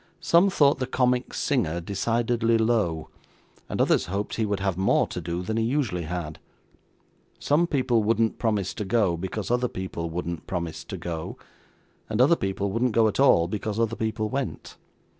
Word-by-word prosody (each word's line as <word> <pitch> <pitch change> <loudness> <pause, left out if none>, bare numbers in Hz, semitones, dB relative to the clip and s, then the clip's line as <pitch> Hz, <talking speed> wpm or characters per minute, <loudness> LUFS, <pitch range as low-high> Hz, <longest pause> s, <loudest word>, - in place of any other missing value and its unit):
Some 175 +4 +4
thought 145 -6 +3
the 130 - -2
comic 125 -1 +1
singer 90 - 0
decidedly 115 +5 0
low, 110 -9 0 0.6
and - - -3
others - - +3
hoped 100 +3 -3
he 110 -2 0
would 100 -1 -1
have 95 -2 -1
more 95 +2 +2
to 90 - -6
do 85 +2 -3
than 110 +4 -2
he 115 - +1
usually 115 - -1
had. 80 -2 -5 1.0
Some 160 +4 +2
people 130 -6 +1
wouldn't 110 +1 +1
promise 105 -5 0
to 105 - -4
go, 100 -3 +2
because 95 +4 -4
other 125 0 +2
people 90 -5 -5
wouldn't 85 0 -5
promise 85 -3 -4
to - - -6
go; 80 -2 -5 0.7
and 110 0 -2
other 140 +7 +6
people 95 -4 -2
wouldn't 115 +3 0
go 115 0 +4
at 110 - -2
all, 85 -12 +5
because 105 +2 -3
other 115 -1 +1
people 110 -1 -2
went. 135 +3 -4
110 Hz, 175 wpm, -25 LUFS, 90-120 Hz, 1.0 s, other